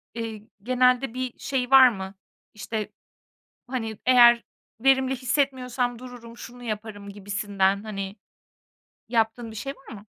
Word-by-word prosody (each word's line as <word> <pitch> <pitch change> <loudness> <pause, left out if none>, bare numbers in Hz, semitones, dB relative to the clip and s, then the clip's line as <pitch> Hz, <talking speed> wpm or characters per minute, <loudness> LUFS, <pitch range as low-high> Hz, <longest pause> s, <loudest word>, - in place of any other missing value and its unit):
eee, 225 -2 -5 0.2
genelde 250 +1 +2
bir 255 -1 -4
şey 265 -2 -2
var 265 -1 +9
mı? 190 -4 -6 0.4
İşte, 215 0 -5 0.8
hani, 225 -4 -4
eğer 240 -2 +7 0.4
verimli 265 0 +3
hissetmiyorsam 255 -2 -1
dururum, 240 -2 -11
şunu 245 +1 -11
yaparım 210 -2 -6
gibisinden, 200 0 -1
hani, 195 -2 -5 0.9
yaptığın 225 0 0
bir 220 - -11
şey 275 +6 -5
var 270 - -13
mı? 205 +1 -13
235 Hz, 125 wpm, -25 LUFS, 210-255 Hz, 0.9 s, var